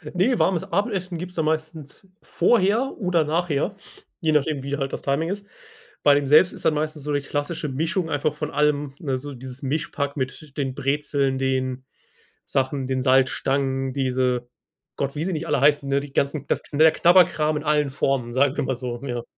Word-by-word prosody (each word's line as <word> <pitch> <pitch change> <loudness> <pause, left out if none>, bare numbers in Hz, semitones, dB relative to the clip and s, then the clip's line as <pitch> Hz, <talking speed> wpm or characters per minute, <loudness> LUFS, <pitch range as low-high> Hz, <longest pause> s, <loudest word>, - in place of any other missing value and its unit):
Ne, 230 +7 +2
warmes 180 -5 +2
Abendessen 185 -2 -2
gibt's 180 +2 -7
dann 160 - 0
meistens 155 +3 -4
vorher 230 +4 +2
oder 180 -5 +2
nachher, 165 +3 -1 0.4
je 160 -4 +1
nachdem 150 -1 +1
wie 140 +1 -3
halt 135 -2 -3
das - - -4
Timing 140 +4 0
ist. 200 +1 -5 0.6
Bei 145 - +7
dem 145 -1 +1
selbst 155 +6 +6
ist - - -9
dann 155 - +3
meistens 155 0 -2
so 150 0 -2
die 145 - +1
klassische 145 +3 -3
Mischung 160 +5 -1
einfach 145 +1 0
von 150 0 -4
allem, 150 -2 +1
ne? 135 -5 -2
So 145 +2 -7
dieses 130 +1 -7
Mischpack 140 0 -2
mit 140 +2 -5
den 135 -3 -2
Brezeln, 140 -1 0
den 130 -1 -1 0.6
Sachen, 135 0 -1
den 130 -1 -1
Salzstangen, 135 0 +1
diese 125 -2 0 0.5
Gott, 140 +1 -2
wie 150 - -2
sie 190 - -1
nicht 160 0 -4
alle - - +1
heißen, 145 -1 +3
ne, 140 0 +2
die 140 -1 -9
ganzen 140 0 0
das - - 0
knä 155 +2 +4
Knabberkram 170 -3 +4
in 150 - -5
allen 150 -2 +2
Formen, 130 -3 -1
sagen 135 +1 +2
wir - - +1
mal 130 - -1
so. 120 -1 -5
Ja. 120 -3 -3
145 Hz, 190 wpm, -23 LUFS, 135-160 Hz, 0.6 s, Bei